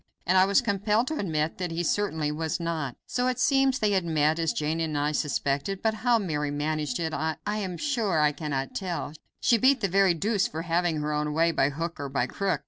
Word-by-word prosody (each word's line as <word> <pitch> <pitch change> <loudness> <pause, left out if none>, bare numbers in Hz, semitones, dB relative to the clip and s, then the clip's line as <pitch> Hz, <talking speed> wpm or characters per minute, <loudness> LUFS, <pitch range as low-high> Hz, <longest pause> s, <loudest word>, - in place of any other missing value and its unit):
And 180 - +2
I 185 0 +6
was 200 +5 +4
compelled 210 +1 +1
to 315 - -3
admit 160 -4 -1
that 180 -1 -2
he 165 +1 -2
certainly 160 -5 0
was 160 +2 -2
not. 160 -6 -3
So 250 0 -1
it 255 -1 0
seems 270 -1 +3
they 210 -4 +1
had 190 -2 +2
met, 155 -1 +1
as 165 -2 +1
Jane 155 +2 -2
and 160 -2 -1
I 145 +1 +1
suspected, 145 +4 -1
but 220 -1 +2
how 235 +2 +2
Mary 150 -8 -2
managed 150 -2 -2
it 160 -2 -2
I 160 0 -2
am 205 -4 -2
sure 225 - 0
I 150 -1 +4
cannot 140 -3 -4
tell; 175 -5 -4 0.3
she 235 - +4
beat 265 +2 +4
the 200 - +2
very 190 -1 +3
deuce 200 +3 +1
for 160 +1 -5
having 170 -2 0
her 150 0 -2
own 150 0 -1
way, 165 +1 +3
by 140 -3 +2
hook 165 +3 -5
or 140 -1 -4
by 135 -2 0
crook. 195 +8 -1
165 Hz, 225 wpm, -27 LUFS, 150-200 Hz, 0.3 s, I